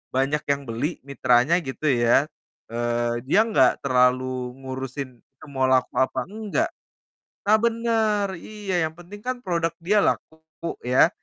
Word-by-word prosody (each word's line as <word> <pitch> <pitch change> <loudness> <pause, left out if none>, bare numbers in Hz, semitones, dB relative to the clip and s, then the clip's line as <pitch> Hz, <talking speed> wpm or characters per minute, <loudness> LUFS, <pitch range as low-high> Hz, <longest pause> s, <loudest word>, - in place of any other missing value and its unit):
banyak 140 +3 +1
yang 140 0 0
beli 125 +9 -3
mitranya 130 +3 +3
gitu 155 -1 -6
ya, 120 +2 +4 0.5
eee, 120 0 -1
dia 195 - +4
nggak 140 - +3
terlalu 125 -1 +1
ngurusin 130 -1 -6
itu 135 - -18
mau 130 -1 +1
laku 130 -1 +2
apa 130 - +1
enggak. 220 - -1 0.8
Nah 215 - +6
benar, 225 -3 +1
iya 205 +1 -6
yang 160 0 -3
penting 185 +4 -11
kan 255 - -1
produk 170 -3 0
dia 190 +6 +1
laku 160 - -1 0.5
ya, 125 +6 +5
140 Hz, 140 wpm, -24 LUFS, 125-195 Hz, 0.8 s, Nah